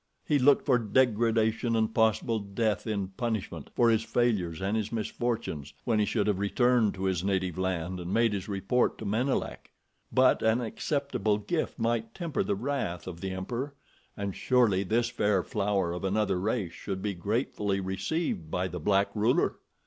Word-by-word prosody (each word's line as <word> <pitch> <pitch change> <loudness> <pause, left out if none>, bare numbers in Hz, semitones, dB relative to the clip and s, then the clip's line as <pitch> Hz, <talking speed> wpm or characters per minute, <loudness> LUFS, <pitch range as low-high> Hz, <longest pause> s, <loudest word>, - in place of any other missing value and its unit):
He 145 -2 +2
looked 140 +2 +4
for 125 -4 +4
degradation 115 0 +2
and 110 0 +1
possible 110 0 +2
death 105 +2 -1
in 100 -3 -2
punishment 100 - -4
for 120 -1 +4
his 110 -1 +3
failures 105 -9 0
and 100 +3 -1
his 110 -1 -1
misfortunes 115 - -3
when 110 -2 +2
he 105 - +3
should 105 -1 0
have 105 -3 +1
returned 115 +1 +2
to 95 - -5
his 95 -2 0
native 95 -3 0
land 95 -1 -2
and 90 +1 -5
made 115 0 +3
his 100 0 -4
report 100 +5 +1
to 110 - -7
Menelek; 120 +7 -1 0.4
but 130 0 +4
an 110 +2 +3
acceptable 120 -3 -1
gift 155 +10 -2
might 115 0 -1
temper 165 -4 -2
the 100 - 0
wrath 115 -7 -3
of 90 -2 -7
the 95 - -3
emperor, 120 +10 -4 0.4
and 100 -2 -3
surely 120 -7 +3
this 115 +5 +1
fair 105 -5 +1
flower 100 -4 0
of 90 - -5
another 95 -1 +1
race 100 -3 -1
should 95 -2 -5
be 105 -1 -1
gratefully 100 +1 -1
received 95 - -2
by 90 +3 -1
the 90 0 -6
black 100 +4 +2
ruler! 110 +3 +1
105 Hz, 170 wpm, -29 LUFS, 95-120 Hz, 0.4 s, looked